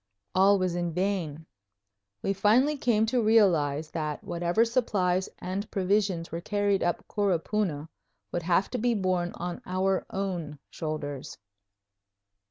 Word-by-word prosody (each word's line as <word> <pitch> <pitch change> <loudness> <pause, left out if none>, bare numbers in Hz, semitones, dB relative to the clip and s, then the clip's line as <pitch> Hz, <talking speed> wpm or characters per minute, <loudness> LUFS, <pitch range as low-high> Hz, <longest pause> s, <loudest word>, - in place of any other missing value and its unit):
All 195 +2 +5
was 185 -2 0
in 175 -1 -2
vain. 175 -4 -2 0.8
We 195 - +1
finally 225 +10 +3
came 230 -5 +2
to 240 +2 +1
realize 165 -9 +3
that 150 -2 -3
whatever 175 +6 +1
supplies 190 -6 +1
and 190 +3 -4
provisions 190 -3 0
were 165 +1 -4
carried 205 0 +1
up 175 - -1
Coropuna 190 -5 0 0.4
would 175 - -1
have 175 +3 +1
to 250 - -2
be 240 +1 +2
borne 185 -3 0
on 175 0 -5
our 185 +1 0
own 175 -6 -3
shoulders. 150 -3 -5
185 Hz, 130 wpm, -28 LUFS, 170-205 Hz, 0.8 s, All